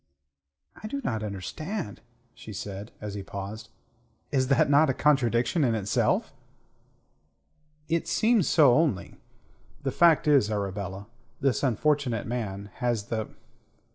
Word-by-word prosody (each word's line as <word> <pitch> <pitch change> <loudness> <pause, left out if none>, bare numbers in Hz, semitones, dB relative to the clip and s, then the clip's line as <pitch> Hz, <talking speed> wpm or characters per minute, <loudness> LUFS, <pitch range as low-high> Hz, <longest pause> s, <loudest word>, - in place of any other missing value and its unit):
"I 215 - -5
do 280 +6 -3
not 110 - -1
understand," 110 - -5 0.3
she 110 - -10
said, 100 +2 -6
as 105 -1 -6
he 100 - -5
paused. 100 +3 -7 0.6
"Is 130 -2 +1
not 135 - +4
that 145 +1 +5
a - - +2
contradiction 135 +1 +2
in 120 -4 +2
itself?" 105 -2 0 1.5
"It 165 0 0
seems 215 +2 +3
so 145 -6 +6
only. 140 - 0 0.7
The 135 - -1
fact 165 +1 +4
is, 140 -8 +4
Arabella, 100 -1 -3 0.3
this 135 -5 +1
unfortunate 135 -2 +1
man 105 -4 -4
has 120 -5 -1
the... 110 -2 -2
120 Hz, 125 wpm, -27 LUFS, 105-150 Hz, 1.5 s, so